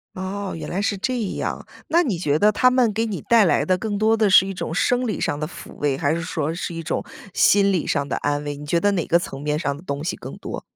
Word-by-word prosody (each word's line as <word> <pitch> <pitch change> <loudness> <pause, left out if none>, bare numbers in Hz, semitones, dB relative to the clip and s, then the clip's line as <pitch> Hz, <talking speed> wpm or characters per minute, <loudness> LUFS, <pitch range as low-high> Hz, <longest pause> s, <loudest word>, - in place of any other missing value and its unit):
哦， 190 +1 -4
原 - - -6
来 190 +3 -2
是 205 -1 0
这 255 +5 -1 0.2
样。 - - -4 0.2
那 340 +2 +4
你 215 - -1
觉 150 -3 0
得 210 +1 +5
它 255 +4 +4
们 250 -4 +3
给 225 +2 -1
你 210 -4 -4
带 230 -4 +4
来 - - +2
的 185 -1 +2
更 205 +1 -3
多 220 +1 +3
的 215 -2 +3
是 190 +1 +7
一 195 - -4
种 165 - -4
生 245 +7 +1
理 215 - -2
上 145 - -1
的 155 - -2
抚 - - -11
慰， 140 -2 0
还 145 +2 +1
是 170 - -3
说 160 -2 -2
是 170 0 -4
一 165 - -5
种 160 - -2 0.3
心 200 0 +4
理 180 -5 0
上 140 -2 -1
的 - - -2
安 145 0 -1
慰， 145 -1 -4
你 150 - -9
觉 170 +3 +1
得 205 +2 +2
哪 175 - -1
个 170 - +3
层 135 -5 -7
面 150 0 -1
上 140 -4 -1
的 155 - -12
东 140 -2 -4
西 175 - -2
更 - - -9
多？ - - -6
180 Hz, 300 characters per minute, -22 LUFS, 150-210 Hz, 0.3 s, 是